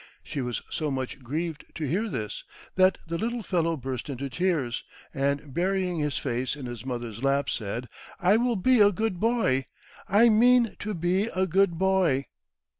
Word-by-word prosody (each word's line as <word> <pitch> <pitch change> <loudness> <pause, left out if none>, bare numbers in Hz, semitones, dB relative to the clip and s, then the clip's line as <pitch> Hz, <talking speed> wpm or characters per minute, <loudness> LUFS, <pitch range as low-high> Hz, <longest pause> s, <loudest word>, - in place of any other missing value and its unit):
She 140 - -4
was 125 -2 -3
so 155 -2 -2
much 130 -1 -3
grieved 155 +5 -4
to 160 - -4
hear 200 - 0
this, 105 - -4 0.3
that 185 0 +4
the 165 0 -3
little 235 0 -2
fellow 165 -4 0
burst 130 -1 -5
into 135 0 -4
tears, 150 -7 0 0.3
and, 140 0 -1
burying 180 0 0
his 150 -1 -1
face 125 +1 -2
in 140 -3 -7
his 120 -2 -6
mother's 120 -3 -5
lap, 140 +1 +1
said, 115 +3 -3 0.3
"I 195 +3 +4
will 240 0 +1
be 245 +6 +3
a 205 0 +7
good 205 -2 -2
boy! 215 - +1 0.4
I 220 +5 +6
mean 235 +1 +5
to 210 0 -3
be 175 +4 +1
a 190 -4 0
good 190 -1 +2
boy!" 185 -7 +2
165 Hz, 175 wpm, -27 LUFS, 135-195 Hz, 0.4 s, a